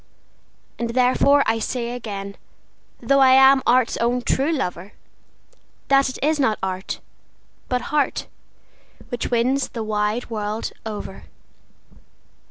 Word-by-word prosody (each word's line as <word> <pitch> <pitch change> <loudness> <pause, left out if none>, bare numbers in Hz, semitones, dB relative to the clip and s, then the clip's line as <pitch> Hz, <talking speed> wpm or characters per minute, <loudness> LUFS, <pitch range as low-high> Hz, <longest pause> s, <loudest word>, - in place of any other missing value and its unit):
And 235 0 -3
therefore 260 +3 +4
I 225 0 +1
say 235 +1 -3
again, 200 -5 -6 0.7
though 275 0 +3
I 260 -1 +6
am 265 0 +6
art's 250 0 +3
own 240 +1 0
true 275 +6 +1
lover, 195 - -4 1.0
That 275 -1 +4
it 260 - -7
is 305 +1 +1
not 225 -7 +2
art, 190 0 -4 0.7
but 250 -2 0
heart, 295 -2 0 0.8
which 245 -2 -3
wins 250 +3 +1
the 230 -3 -5
wide 215 +2 -2
world 215 0 -3 0.2
over. 205 -3 -7
240 Hz, 120 wpm, -22 LUFS, 215-265 Hz, 1.0 s, I